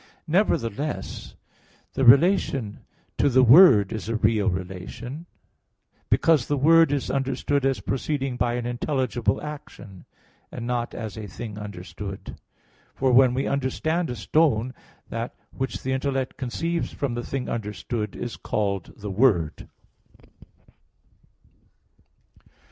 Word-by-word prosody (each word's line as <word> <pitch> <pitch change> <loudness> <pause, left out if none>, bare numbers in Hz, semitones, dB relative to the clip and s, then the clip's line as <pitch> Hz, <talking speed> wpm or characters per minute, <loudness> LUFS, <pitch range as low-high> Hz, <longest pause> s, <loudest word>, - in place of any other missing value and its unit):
Nevertheless, 150 - -1 0.6
the 135 - -1
relation 135 - +4 0.4
to 145 - +4
the 130 0 +5
word 125 - +7
is 110 0 -5
a 115 - -1
real 110 -1 +2
relation; 95 - -6 0.8
because 155 -7 +3
the 145 - 0
word 165 +2 +5
is 145 -2 -1
understood 135 +1 0
as 135 - -1
proceeding 135 -1 -2
by 120 0 0
an 120 -1 -3
intelligible 120 -3 -1
action; 150 -11 -9 0.5
and 120 - -6
not 120 -1 -2
as 110 -2 -6
a 105 - -6
thing 105 +2 -7
understood. 100 0 -8 0.6
For 130 -1 +1
when 125 0 +5
we 135 - 0
understand 155 +5 -1
a 125 - -3
stone; 130 -5 +1 0.4
that 115 +1 -4 0.2
which 130 -1 -4
the 130 - -2
intellect 130 -1 -2
conceives 165 +6 -2
from 140 -4 -3
the 120 0 -3
thing 135 0 -4
understood, 105 0 -4
is 120 - -5
called 100 -4 -2
the 105 -1 -6
word. 95 - +1
125 Hz, 120 wpm, -25 LUFS, 110-140 Hz, 0.8 s, word